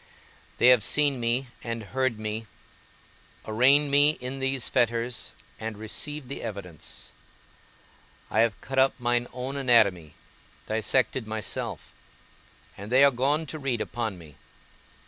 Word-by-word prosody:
They 125 - +6
have 125 -3 +7
seen 145 +4 +2
me 120 +2 0
and 115 -1 -4
heard 130 -3 +1
me, 110 +1 -4 1.0
arraigned 135 +6 +4
me 145 +2 +4
in 130 +2 -5
these 135 -2 0
fetters 120 +1 0 0.3
and 110 -1 -5
received 135 +6 -4
the 140 - -6
evidence; 90 -8 -7 1.2
I - - +1
have 115 -3 +2
cut 135 0 -2
up 135 +1 +3
mine 120 0 +1
own 130 +2 -5
anatomy, 105 - +3 0.5
dissected 110 +2 0
myself, 110 -1 -4 0.8
and 100 +3 -9
they 130 +2 +6
are 140 - +7
gone 140 +6 +1
to 155 +1 -7
read 135 -5 -1
upon 110 -4 -3
me. 80 -4 -14
120 Hz, 130 wpm, -27 LUFS, 110-135 Hz, 1.2 s, have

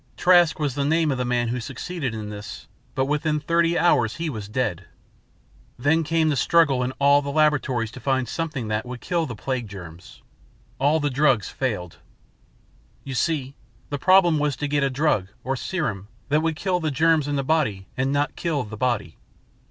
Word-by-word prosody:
Trask 175 -3 +5
was 145 -4 -1
the 140 +1 -1
name 160 +1 +2
of 130 - -2
the 125 - 0
man 120 -1 0
who 125 +2 -2
succeeded 135 +1 -4
in 105 -1 -5
this, 105 0 -8 0.3
but 130 - +1
within 150 +2 0
thirty 170 +3 +1
hours 125 -10 +3
he 165 -2 -3
was 105 -5 -6
dead. 105 -6 -2 0.9
Then 160 +6 +2
came 160 0 +1
the 150 - +1
struggle 145 -2 +3
in 125 +1 -1
all 140 +1 +4
the 140 - -5
laboratories 140 -6 +1
to 125 - -10
find 130 -1 0
something 155 -8 -3
that 105 0 -1
would 125 0 -7
kill 170 +1 -1
the 120 - -6
plague 125 +1 -3
germs. 90 -4 -11 0.6
All 145 +4 +3
drugs 135 -6 +2
failed. 105 -10 -3 1.1
You 135 - -6
see, 135 -1 -1 0.4
the 145 - -2
problem 175 -3 +5
was 145 -1 0
to 145 - -3
get 145 0 +1
a 140 - +2
drug, 135 -8 +1 0.2
or 135 +1 -1
serum, 120 - -3 0.2
that 150 +2 +3
would 160 -1 0
kill 180 +2 0
the 160 -2 -1
germs 155 +1 +2
in 145 - -1
the 140 - 0
body 130 -11 0
and 130 +1 0
not 145 +1 0
kill 155 -6 -1
the 110 -1 -8
body. 110 -9 -1
140 Hz, 190 wpm, -24 LUFS, 120-155 Hz, 1.1 s, Trask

